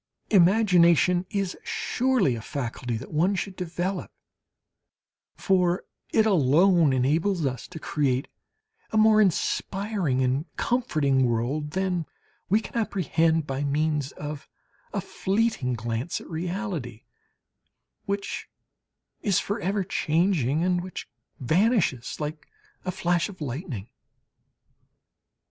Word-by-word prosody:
Imagination 180 -4 +5
is 195 -2 -2
surely 250 - +1
a 115 - -5
faculty 120 -1 -4
that 125 - -9
one 175 +6 +2
should 190 0 -3
develop; 180 +2 -3 1.2
for 180 -2 +1 0.3
it 220 - +4
alone 170 -2 +4
enables 155 +7 +1
us 130 -2 -3
to 180 - -10
create 140 -4 0 0.6
a 220 - -1
more 215 0 +6
inspiring 190 -5 0
and 130 +6 0
comforting 150 - +1
world 125 +6 -1
than 185 -4 -1 0.4
we 210 +4 +4
can 220 - -10
apprehend 165 - +1
by 135 0 -3
means 150 -1 0
of 150 -1 -7 0.4
a - - -2
fleeting 195 - 0
glance 115 +6 -3
at - - -12
reality, 170 - -4 1.0
which 200 0 -3 0.7
is 200 -4 +2
for 205 +3 -3
ever 195 +1 0
changing 165 -4 +1
and 180 -1 +1
which 185 0 -7 0.3
vanishes 160 - +1
like 150 0 -5 0.4
a 185 - -1
flash 175 0 0
of 190 - -11
lightning. 135 - -5
170 Hz, 110 wpm, -26 LUFS, 140-195 Hz, 1.2 s, more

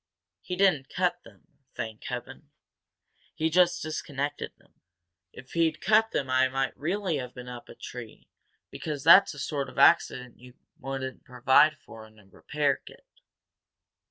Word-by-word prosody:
He 180 - -5
didn't 180 -9 +2
cut 180 -1 -1
them, 105 -4 -19 0.3
thank 110 -1 -6
Heaven! - - -7 0.9
He 160 +1 0
just 175 +1 +3
disconnected 145 -2 -4
them. - - -30 0.5
If 125 0 -14
he'd 160 -2 +1
cut 215 +4 +3
them 135 - -2
I 130 0 +3
might 135 0 -2
really 180 +1 -2
have 125 -2 -7
been 125 -1 -9
up 120 -1 -9
a - - -11
tree 120 -3 -10 0.4
because 150 -3 -5
that's 185 +4 +7
the - - -12
sort 140 0 -3
of - - -15
accident 125 -7 +3
you 125 +1 -15 0.2
wouldn't 135 -1 -6
provide 130 +5 +3
for 110 -4 -13
in 110 0 -23
a 105 - -19
repair 140 +8 -1
kit." - - -15
140 Hz, 155 wpm, -27 LUFS, 125-165 Hz, 0.9 s, that's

